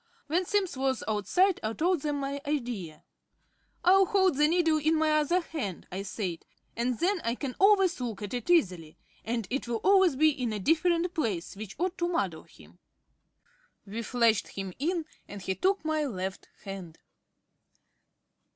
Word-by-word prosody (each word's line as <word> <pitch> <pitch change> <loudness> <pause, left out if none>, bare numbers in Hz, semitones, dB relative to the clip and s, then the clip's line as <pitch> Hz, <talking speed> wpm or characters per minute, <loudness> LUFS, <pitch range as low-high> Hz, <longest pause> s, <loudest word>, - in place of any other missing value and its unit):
When 345 +5 0
Simms 400 -6 0
was 265 0 -1
outside 335 - +2
I 220 +1 -2
told 345 +4 +1
them 295 -1 -1
my 280 0 -3
idea. 235 - -3 0.8
"I'll 380 +1 +6
hold 380 -6 +3
the 300 +2 +4
needle 325 -1 +2
in 315 +2 +2
my 315 0 +2
other 305 +4 +2
hand," 270 - -5
I 190 +2 -3
said, 195 -4 -4 0.3
"and 240 +1 -1
then 365 +1 +1
I 230 +1 0
can 265 -1 -4
always 390 -4 +4
look 225 -4 -4
at 205 - -5
it 245 +3 -4
easily, 180 - +2 0.3
and 230 -1 -2
it 275 -1 -2
will 235 -1 -1
always 380 -6 +5
be 310 +3 +5
in 250 -6 -3
a 210 - -3
different 335 - +2
place, 210 - -2
which 200 -1 -8
ought 360 +3 -2
to 345 - +1
muddle 195 - -2
him." 80 +3 -19 1.1
We 215 +4 -5
fetched 230 -2 +2
him 195 -2 -6
in, 330 +3 -1 0.2
and 205 - -8
he 190 0 -2
took 380 - 0
my 310 -1 0
left 190 -6 -5 0.2
hand.... 190 -5 -8
275 Hz, 170 wpm, -29 LUFS, 210-345 Hz, 1.1 s, I'll